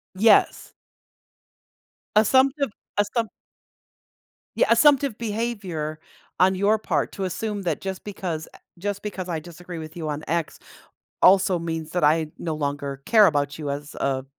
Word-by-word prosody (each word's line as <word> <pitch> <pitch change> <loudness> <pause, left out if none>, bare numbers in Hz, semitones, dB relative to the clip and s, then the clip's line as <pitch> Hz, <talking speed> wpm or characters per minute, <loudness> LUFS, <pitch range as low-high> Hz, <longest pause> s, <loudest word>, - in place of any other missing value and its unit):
Yes. 215 +2 +3 1.4
Assumptive 265 +4 +4 0.3
assump 215 +2 0 1.3
Yeah, - - +4
assumptive 275 -1 +4
behavior 205 -9 -3 0.4
on 190 +1 +5
your 205 +3 +2
part - - -1
to 195 - -4
assume 205 +3 -3
that 175 - -2
just 190 -1 -5
because, 180 -6 -5
uh - - -14 0.2
just 200 +2 -3
because 190 -3 -5
I 165 -2 -2
disagree 175 +1 -9
with 155 0 -8
you 160 -2 -4
on 150 0 -4
x 170 -1 -2 0.7
also 185 -1 +6
means 165 -2 -4
that 180 - -1
I 155 +1 +3
no 165 -2 -3
longer 140 -2 -3
care 220 -2 +7
about 145 -3 +1
you 150 -2 -4
as 145 +1 -6
a 135 -1 -1
180 Hz, 140 wpm, -24 LUFS, 155-210 Hz, 1.4 s, care